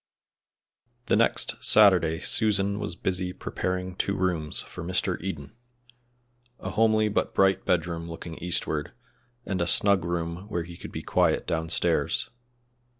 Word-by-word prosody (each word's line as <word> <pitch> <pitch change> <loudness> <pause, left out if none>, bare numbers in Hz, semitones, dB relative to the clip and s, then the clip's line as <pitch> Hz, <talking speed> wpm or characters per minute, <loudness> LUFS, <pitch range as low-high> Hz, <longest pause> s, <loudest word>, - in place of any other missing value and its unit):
THE - - +2
next - - +1
Saturday 90 -6 +5
Susan 100 -2 +2
was 105 -1 -4
busy 90 -1 -1
preparing 90 0 -4
two 100 +1 -1
rooms 85 -5 -1
for - - -9
Mr. 90 -1 -1
Eden 80 -2 -6 1.0
a - - -5
homely 110 0 +3
but 105 - -1
bright 95 -1 +3
bedroom 85 -1 -1
looking 80 0 -8
eastward, 80 -3 -2 0.5
and 95 -3 -2
a 85 - 0
snug 100 -1 +4
room 85 +2 -4
where 85 -4 -2
he 85 +1 -10
could - - -10
be - - -6
quiet - - +1
downstairs. 80 0 0
90 Hz, 135 wpm, -26 LUFS, 85-100 Hz, 1.0 s, Saturday